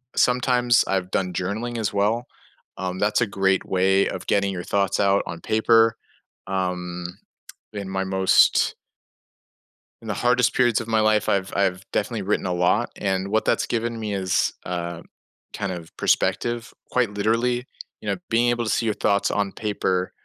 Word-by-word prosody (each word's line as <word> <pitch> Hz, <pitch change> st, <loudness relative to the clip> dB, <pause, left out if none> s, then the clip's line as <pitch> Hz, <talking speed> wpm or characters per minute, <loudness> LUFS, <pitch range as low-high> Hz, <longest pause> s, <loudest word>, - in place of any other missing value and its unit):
sometimes 125 Hz, -2 st, +3 dB
I've 95 Hz, -1 st, -1 dB
done 90 Hz, -2 st, -1 dB
journaling 110 Hz, +7 st, -3 dB
as 105 Hz, -, -1 dB
well. 105 Hz, +4 st, 0 dB, 0.5 s
Um, 95 Hz, 0 st, -4 dB
that's 105 Hz, +3 st, +2 dB
a -, -, +4 dB
great 95 Hz, -1 st, +1 dB
way 95 Hz, +1 st, +2 dB
of -, -, -6 dB
getting 100 Hz, -1 st, +2 dB
your 90 Hz, -, -5 dB
thoughts 100 Hz, 0 st, 0 dB
out 100 Hz, 0 st, +3 dB
on 85 Hz, 0 st, -7 dB
paper. 115 Hz, +2 st, +3 dB, 0.5 s
Um, 90 Hz, -2 st, -3 dB, 0.7 s
in 100 Hz, -2 st, -5 dB
my 95 Hz, 0 st, -1 dB
most 95 Hz, 0 st, +3 dB, 1.3 s
in 110 Hz, -, -11 dB
the -, -, 0 dB
hardest 125 Hz, +2 st, +2 dB
periods 120 Hz, -2 st, +2 dB
of 115 Hz, -, -8 dB
my 110 Hz, -1 st, +2 dB
life, 110 Hz, -1 st, +2 dB
I've 95 Hz, -1 st, 0 dB
I've 95 Hz, -1 st, 0 dB
definitely 105 Hz, +1 st, -1 dB
written 100 Hz, 0 st, 0 dB
a 90 Hz, -, -1 dB
lot. 90 Hz, 0 st, +2 dB
And 95 Hz, 0 st, -1 dB
what 110 Hz, +1 st, +1 dB
that's -, -, +1 dB
given 115 Hz, 0 st, -2 dB
me 105 Hz, -2 st, -3 dB
is, 95 Hz, -2 st, +1 dB
uh, 85 Hz, -1 st, -4 dB, 0.5 s
kind 100 Hz, -1 st, -3 dB
of 85 Hz, -2 st, -8 dB
perspective 120 Hz, 0 st, 0 dB, 0.2 s
quite 120 Hz, -5 st, +1 dB
literally. 115 Hz, +4 st, 0 dB, 0.4 s
You -, -, -4 dB
know, -, -, 0 dB
being 120 Hz, +1 st, +3 dB
able 120 Hz, -1 st, 0 dB
to -, -, -2 dB
see 115 Hz, +3 st, +1 dB
your 110 Hz, -, 0 dB
thoughts 100 Hz, 0 st, +1 dB
on 100 Hz, -2 st, -1 dB
paper 95 Hz, -3 st, -1 dB
100 Hz, 170 wpm, -23 LUFS, 95-115 Hz, 1.3 s, a